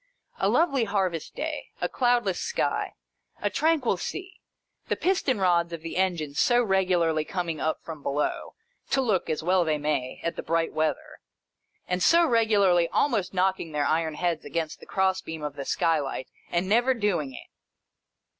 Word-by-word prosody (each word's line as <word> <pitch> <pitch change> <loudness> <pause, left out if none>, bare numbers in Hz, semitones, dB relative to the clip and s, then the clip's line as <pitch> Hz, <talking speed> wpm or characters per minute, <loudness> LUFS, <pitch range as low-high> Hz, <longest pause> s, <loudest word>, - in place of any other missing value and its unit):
A - - +2
lovely 275 -8 +2
harvest 190 -6 -2
day, 310 -1 -4
a - - 0
cloudless 240 -7 +1
sky, - - -1 0.4
a - - -1
tranquil 305 - +2
sea. 380 - -6 0.5
The - - 0
piston 335 - +1
rods 170 -2 +2
of 165 -1 -6
the 165 - -5
engines 170 -6 -1
so 245 0 +4
regularly 180 -6 +2
coming 170 -2 -3
up 160 - -1
from 160 -3 -8
below, 140 +1 -2 0.3
to - - +2
look 215 -8 +1
(as 155 0 -1
well 180 +1 +3
they 155 -2 0
may) 145 -4 -2
at 170 -1 -2
the - - -2
bright 165 0 0
weather, 155 0 -2 0.7
and 180 0 -1
so 335 - +5
regularly 205 - +3
almost 210 -10 0
knocking 185 -3 0
their 145 -1 +1
iron 160 0 0
heads 170 -2 -1
against 165 -2 -3
the - - -14
cross 190 -1 +1
beam 160 -4 -7
of 145 -1 -4
the 140 -1 -5
skylight, 145 -6 0 0.2
and 175 +2 0
never 240 +5 +3
doing 175 - -1
it - - -12
180 Hz, 165 wpm, -26 LUFS, 160-220 Hz, 0.7 s, so